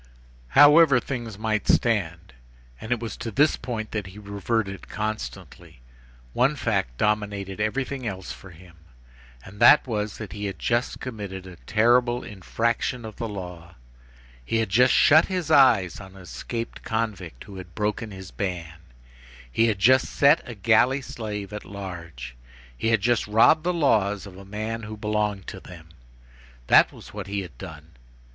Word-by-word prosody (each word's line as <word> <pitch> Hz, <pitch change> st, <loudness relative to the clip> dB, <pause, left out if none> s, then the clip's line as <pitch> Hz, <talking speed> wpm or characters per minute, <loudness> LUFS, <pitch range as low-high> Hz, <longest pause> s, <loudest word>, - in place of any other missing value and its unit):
However 145 Hz, -2 st, +8 dB
things 120 Hz, -5 st, -6 dB
might 110 Hz, -1 st, -1 dB
stand,—and 80 Hz, -, -2 dB
it 120 Hz, -, +1 dB
was 115 Hz, -3 st, -5 dB
to 115 Hz, 0 st, -5 dB
this 145 Hz, +7 st, +3 dB
point 115 Hz, -3 st, -5 dB
that 105 Hz, -3 st, -3 dB
he 95 Hz, +2 st, -12 dB
reverted 100 Hz, 0 st, -3 dB
constantly,—one -, -, -4 dB
fact 95 Hz, -, -1 dB
dominated 100 Hz, -2 st, -1 dB
everything 130 Hz, +4 st, -2 dB
else 95 Hz, -3 st, -5 dB
for 95 Hz, -, -11 dB
him, 85 Hz, 0 st, -16 dB, 0.7 s
and 100 Hz, +2 st, -13 dB
that 120 Hz, +5 st, +7 dB
was, 105 Hz, -4 st, -3 dB
that 105 Hz, -5 st, -8 dB
he 105 Hz, 0 st, -5 dB
had 100 Hz, -, -4 dB
just 120 Hz, +1 st, -1 dB
committed 100 Hz, -6 st, -7 dB
a 90 Hz, -2 st, -11 dB
terrible 120 Hz, +2 st, +3 dB
infraction 115 Hz, +4 st, -2 dB
of 110 Hz, -2 st, -9 dB
the 115 Hz, -, -4 dB
law. 90 Hz, -3 st, -8 dB, 0.7 s
He 115 Hz, -, -1 dB
had 110 Hz, -3 st, 0 dB
just 125 Hz, +6 st, +4 dB
shut 155 Hz, +3 st, +6 dB
his 185 Hz, -4 st, -3 dB
eyes 115 Hz, -, +5 dB
on 95 Hz, -1 st, -12 dB
an 95 Hz, -, -12 dB
escaped 115 Hz, +6 st, -6 dB
convict 105 Hz, -, -4 dB
who 100 Hz, -1 st, -11 dB
had 90 Hz, -1 st, -11 dB
broken 105 Hz, +1 st, -2 dB
his 95 Hz, -2 st, -10 dB
ban. 85 Hz, -5 st, -5 dB, 0.7 s
He 115 Hz, -, +3 dB
had 110 Hz, -3 st, 0 dB
just 130 Hz, +7 st, +4 dB
set 145 Hz, +3 st, +4 dB
a 120 Hz, -, -7 dB
galley 115 Hz, +7 st, +3 dB
slave 105 Hz, -4 st, -6 dB
at 105 Hz, -, -6 dB
large. 85 Hz, -11 st, -8 dB, 0.4 s
He 65 Hz, -, -3 dB
had 115 Hz, -2 st, +3 dB
just 120 Hz, 0 st, +1 dB
robbed 115 Hz, +9 st, +5 dB
the 180 Hz, -, +1 dB
laws 105 Hz, -, +1 dB
of 95 Hz, -2 st, -11 dB
a 95 Hz, +1 st, -12 dB
man 110 Hz, +3 st, -4 dB
who 110 Hz, 0 st, -8 dB
belonged 105 Hz, -2 st, -1 dB
to -, -, -8 dB
them. 80 Hz, -3 st, -13 dB, 0.8 s
That -, -, +6 dB
was -, -, -14 dB
what -, -, -6 dB
he 100 Hz, 0 st, -2 dB
had 85 Hz, -9 st, -10 dB
done. -, -, -10 dB
105 Hz, 160 wpm, -25 LUFS, 95-115 Hz, 0.8 s, However